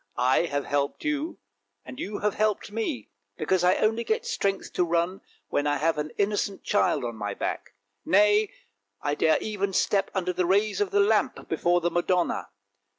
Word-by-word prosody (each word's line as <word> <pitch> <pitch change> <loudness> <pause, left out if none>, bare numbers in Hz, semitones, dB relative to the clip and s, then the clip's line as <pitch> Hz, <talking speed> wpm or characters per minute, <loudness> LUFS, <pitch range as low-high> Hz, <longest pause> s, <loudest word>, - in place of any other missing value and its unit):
" - - -45 0.2
I - - +3
have 145 -3 -2
helped 140 0 -1
you, 305 +2 -2 0.5
and 125 0 -9
you 205 +1 -4
have 210 -1 +1
helped 215 -1 0
me, 210 - -3 0.3
because 180 +3 +1
I 180 +1 +5
only 225 +2 +1
get 450 - -1
strength 200 - -2
to 180 - +2
run 170 +2 0 0.3
when 145 - 0
I 145 0 +1
have 155 +1 +1
an 150 +1 -2
innocent 205 -1 -1
child 205 - +1
on 120 -1 -4
my 105 -2 -4
back! - - -4 0.3
Nay, 210 +1 +4 0.5
I 145 - 0
dare 160 +2 +3
even 200 -2 -2
step 195 +1 +2
under 180 -1 0
the 180 -1 0
rays 205 +2 +2
of 205 - +1
the 205 - +3
lamp 210 +1 +1
before 175 +2 +1
the 175 +1 0
Madonna. 175 0 0
190 Hz, 185 wpm, -26 LUFS, 165-210 Hz, 0.5 s, I